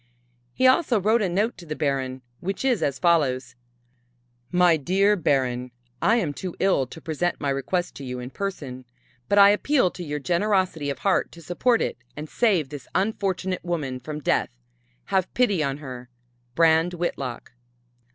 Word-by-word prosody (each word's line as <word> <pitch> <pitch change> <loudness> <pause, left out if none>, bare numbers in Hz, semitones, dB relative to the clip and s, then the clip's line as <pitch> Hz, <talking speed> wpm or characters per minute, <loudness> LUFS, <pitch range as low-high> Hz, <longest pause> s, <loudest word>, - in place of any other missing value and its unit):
He 260 - +2
also 255 -3 +4
wrote 215 +4 +2
a 195 - +1
note 200 +4 0
to 175 - -11
the 155 - -4
Baron 130 -3 -2 0.2
which 195 +7 -3
is 250 -6 +2
as 140 -2 0
follows: 135 -8 +1 1.0
"My 180 -2 +5
dear 190 +7 +2
Baron: 130 -7 0 0.3
"I 225 - +4
am 175 -11 0
too 180 +3 -6
ill 185 -9 +2
to 160 - -10
present 165 +2 -2
my 140 -2 -1
request 175 +7 -1
to 140 - -8
you 125 -1 -5
in 125 +1 -7
person, 140 -11 -5 0.4
but 200 - +3
I 200 0 +9
appeal 230 -2 +2
to 180 - -8
your 150 -2 -3
generosity 180 -1 0
of 140 - -3
heart 195 -2 +1
to 170 - -12
support 225 - +1
it - - -3 0.2
and 150 +1 -5
save 185 - +1
this 145 -2 -9
unfortunate 190 -3 -1
woman 150 -7 -3
from 150 +4 -6
death. - - +1 0.6
Have 190 -1 +1
pity 205 -9 +2
on 140 -2 -1
her. 125 -4 -9 0.5
"BRAND 165 +2 +4
WHITLOCK." 135 -8 -4
170 Hz, 170 wpm, -24 LUFS, 140-195 Hz, 1.0 s, I